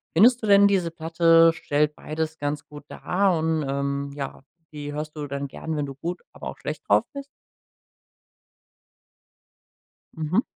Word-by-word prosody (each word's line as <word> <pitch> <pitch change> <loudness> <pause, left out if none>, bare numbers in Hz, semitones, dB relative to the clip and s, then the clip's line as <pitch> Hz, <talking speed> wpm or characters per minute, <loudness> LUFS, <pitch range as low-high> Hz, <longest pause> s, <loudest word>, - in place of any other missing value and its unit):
Findest 235 +8 +6
du 220 - -3
denn 200 0 +7
diese 190 -4 +1
Platte 165 0 +4
stellt 150 -1 0
beides 160 +1 -4
ganz 145 0 -3
gut 150 -1 -11
dar 190 -2 +1
und, 160 -1 0
ähm, 140 0 -2
ja, 140 -2 -6 0.3
die 145 -1 -6
hörst 150 +1 -5
du 150 -1 -5
dann 140 0 -4
gern, 160 +4 -5
wenn 145 - -1
du 140 - -7
gut, 170 +6 -5
aber - - -8
auch - - -7
schlecht - - -6
drauf - - +5
bist? 280 -1 -7 2.9
Mhm. 160 - 0
155 Hz, 155 wpm, -25 LUFS, 145-170 Hz, 2.9 s, denn